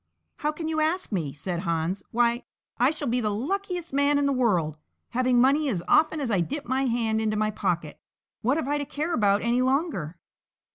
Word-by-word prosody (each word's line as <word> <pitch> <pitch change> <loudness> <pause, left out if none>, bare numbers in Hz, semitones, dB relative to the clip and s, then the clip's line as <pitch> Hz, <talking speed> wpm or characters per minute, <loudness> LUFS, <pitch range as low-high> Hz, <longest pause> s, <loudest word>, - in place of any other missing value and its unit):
"How 300 - 0
can 315 +1 -5
you 315 -1 -1
ask 330 +2 0
me?" 165 -8 -1
said 170 +5 -4
Hans; 170 +1 -1
"why, 235 +1 +2 0.4
I 250 +2 +5
shall 300 -2 -3
be 245 +1 +1
the 215 - 0
luckiest 350 - -3
man 285 +1 +3
in 285 - +2
the 280 - +2
world; 180 - +1 0.3
having 250 0 +2
money 280 +4 +4
as 180 -8 -2
often 315 0 +4
as 265 -5 -1
I 195 - +2
dip 285 - -3
my 260 +2 0
hand 230 -3 0
into 215 -1 0
my 215 0 +1
pocket, 175 -7 -2 0.4
what 255 +6 +2
have 315 - -2
I 290 +1 0
to 285 - -3
care 305 +5 -3
about 205 -5 +2
any 240 +2 +2
longer?" 255 - 0
245 Hz, 205 wpm, -26 LUFS, 205-290 Hz, 0.4 s, I